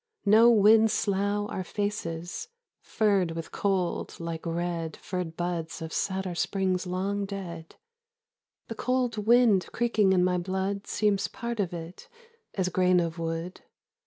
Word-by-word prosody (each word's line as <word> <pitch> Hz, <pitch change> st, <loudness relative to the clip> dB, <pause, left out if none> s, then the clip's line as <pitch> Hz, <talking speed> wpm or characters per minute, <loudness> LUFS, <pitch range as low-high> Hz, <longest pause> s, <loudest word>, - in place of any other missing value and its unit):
No 220 Hz, +3 st, +7 dB
winds 220 Hz, 0 st, +6 dB
slough 205 Hz, +1 st, 0 dB
Our 185 Hz, -, -3 dB
faces, 185 Hz, -, -4 dB, 0.3 s
furred 200 Hz, -6 st, +1 dB
with 165 Hz, 0 st, -6 dB
cold 190 Hz, -3 st, -1 dB
like 165 Hz, 0 st, -5 dB
red 165 Hz, -1 st, -3 dB
Furred 180 Hz, -4 st, -5 dB
buds 175 Hz, -2 st, -3 dB
of 160 Hz, -1 st, -6 dB
satyr 190 Hz, -2 st, -2 dB
springs 185 Hz, 0 st, -1 dB
long 195 Hz, +3 st, -1 dB
dead. 170 Hz, -5 st, -7 dB, 0.9 s
The -, -, -4 dB
cold 250 Hz, +1 st, 0 dB
wind 235 Hz, -5 st, +5 dB
creaking 220 Hz, -4 st, +2 dB
in 180 Hz, -1 st, +4 dB
my 180 Hz, 0 st, +2 dB
blood 190 Hz, +2 st, -3 dB
Seems 205 Hz, -2 st, +1 dB
part 235 Hz, -1 st, -5 dB
of 190 Hz, -4 st, 0 dB
it, 170 Hz, +1 st, -8 dB, 0.5 s
as 185 Hz, -2 st, 0 dB
grain 180 Hz, 0 st, +3 dB
of 165 Hz, 0 st, -2 dB
wood. 165 Hz, +2 st, -4 dB
190 Hz, 135 wpm, -28 LUFS, 170-205 Hz, 0.9 s, No